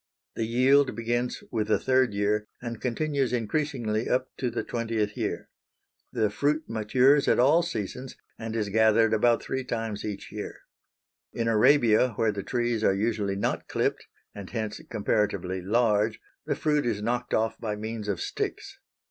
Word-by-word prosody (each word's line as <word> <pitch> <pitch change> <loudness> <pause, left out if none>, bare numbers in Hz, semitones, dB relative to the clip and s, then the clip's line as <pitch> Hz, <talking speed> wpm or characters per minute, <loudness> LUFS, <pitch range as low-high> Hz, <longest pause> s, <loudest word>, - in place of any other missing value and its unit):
The 115 - -1
yield 130 +4 +4
begins 120 +1 -2
with 110 -3 -1
the 110 - +3
third 130 -2 +2
year 105 +1 0
and 115 -2 -6
continues 135 +1 0
increasingly 120 -2 -1
up 130 +1 +1
to 125 - -1
the 120 - -3
twentieth 115 -3 -2
year. - - -3 0.6
The 110 -4 0
fruit 150 +8 0
matures 125 +6 +3
at - - +4
all 145 +7 +5
seasons, 125 - -5 0.2
and 110 0 -5
is 105 -3 -1
gathered 110 +1 +4
about 115 +2 +3
three 130 0 -3
times 115 -4 -3
each 105 -2 -6
year. - - -7 0.7
In 115 -1 -1
Arabia, 120 0 +4
where 110 0 +2
the 100 -1 -4
trees 120 +1 -1
are 95 - +3
usually 105 -1 -1
not 100 - -2
clipped, - - -1 0.3
and 100 -2 -8
hence 110 -2 -4
comparatively 100 -4 -1
large, 110 +1 +2 0.3
the - - 0
fruit 150 -1 +1
is 105 -3 -1
knocked 120 +2 -1
off 110 0 0
by 105 -2 -3
means 110 0 -5
of 100 -4 -1
sticks. - - -4
115 Hz, 160 wpm, -27 LUFS, 105-125 Hz, 0.7 s, all